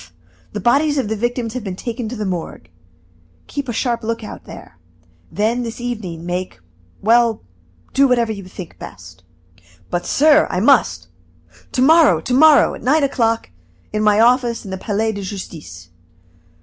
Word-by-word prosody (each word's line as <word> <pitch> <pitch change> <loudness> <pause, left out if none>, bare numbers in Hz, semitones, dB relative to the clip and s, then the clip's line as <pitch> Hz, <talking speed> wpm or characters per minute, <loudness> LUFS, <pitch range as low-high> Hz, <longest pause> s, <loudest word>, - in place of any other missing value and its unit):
the - - -4
bodies 290 +5 +2
of 255 -6 -1
the 220 - -1
victims 240 +1 -2
have 255 -3 -5
been 190 -3 -5
taken 235 +2 -5
to 250 - -6
the 210 -2 -4
Morgue. 170 - -5 0.7
Keep 280 -2 -5
a - - 0
sharp 235 0 -1
lookout 225 -1 -5
there. 85 - -12 0.5
Then, 225 +4 0
this 230 0 -6
evening 205 -9 -5
make 180 - -4 0.4
well 230 +1 +3 0.5
do 275 +1 +4
whatever 240 -3 +1
you 200 -2 -6
think 185 -2 -10
best." 90 -1 -11 0.7
"But, 175 0 -2
sir, 305 +1 +4
I 180 - -1
must 185 - +3 0.3
" 90 +2 -28
"To 255 - +2
morrow! 320 +2 +5
to 250 - -3
morrow, 305 +3 +6
at - - -9
nine 290 +4 +2
o'clock, 230 - 0 0.4
in 215 - 0
my 210 0 +3
office 240 0 +2
in 195 - -7
the 190 - -3
Palais 220 +3 -1
de 200 -2 -6
Justice." 160 - -8
225 Hz, 165 wpm, -19 LUFS, 185-250 Hz, 0.7 s, morrow